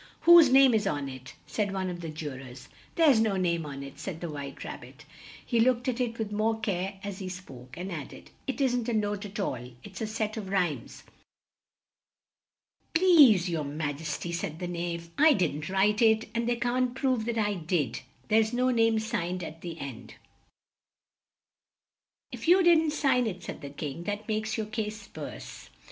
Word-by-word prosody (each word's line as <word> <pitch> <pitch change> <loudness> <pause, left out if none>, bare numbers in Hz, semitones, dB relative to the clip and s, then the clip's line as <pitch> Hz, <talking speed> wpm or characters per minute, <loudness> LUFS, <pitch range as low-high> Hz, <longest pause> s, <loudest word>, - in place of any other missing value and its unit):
"Whose 340 -4 +8
name 265 -1 +7
is 215 -2 +2
on 145 -1 -1
it?" 130 -1 -9
said 205 -2 -2
one 190 -1 -2
of 175 -1 -4
the 165 - -5
ju 155 -1 -5
rors. 130 0 -11 0.3
"There's 300 -8 +5
no 215 -3 +2
name 170 -4 0
on 140 -1 -6
it," 140 -1 -10
said 180 -5 -5
the 170 -2 -5
White 140 -2 -7
Rab - - -7
bit; - - -14 0.4
he 235 - +1
looked 245 +1 +3
at 255 0 0
it 230 -2 -2
with 220 -2 -3
more 220 +2 0
care 195 -2 -2
as 200 -1 -5
he 190 -2 -5
spoke, 130 -9 -10
and 185 +2 -5
add 155 -5 -6
ed, - - -13 0.2
"it 270 - -3
isn't 245 -3 +1
a - - 0
note 205 -1 -1
at 205 +2 -7
all; 125 -10 -3
it's 200 0 -9
a 220 - -1
set 215 0 -3
of 200 -3 -5
rhymes." 180 -6 -2 1.9
"Please 295 - +6
your 165 -3 -1
ma 145 +1 -3
jes 150 +1 -4
ty," 175 - -5
said 165 -2 -3
the 180 0 -4
Knave, 170 -1 -4
"I 310 +1 +7
didn't 160 - -1
write 205 +3 +2
it, 220 -1 +4
and 235 +1 -1
they 240 - +2
can't 245 +1 0
prove 255 -4 0
that 235 0 -2
I 210 -2 +1
did; 160 - -1 0.3
there's 220 +1 +3
no 255 +1 +2
name 225 -2 +3
signed 185 -5 -2
at 160 +1 -8
the 170 -2 -6
end." 135 -5 -8 2.2
"If - - -7
you 365 +2 +6
didn't 325 -2 +5
sign 260 -5 +2
it," 180 -4 -5
said - - -7
the 140 - -7
King, 145 +3 -6
"that 205 +2 -4
makes 220 0 -1
your 220 - -1
case 215 -2 -5
worse. - - -8
205 Hz, 195 wpm, -28 LUFS, 170-230 Hz, 2.2 s, Whose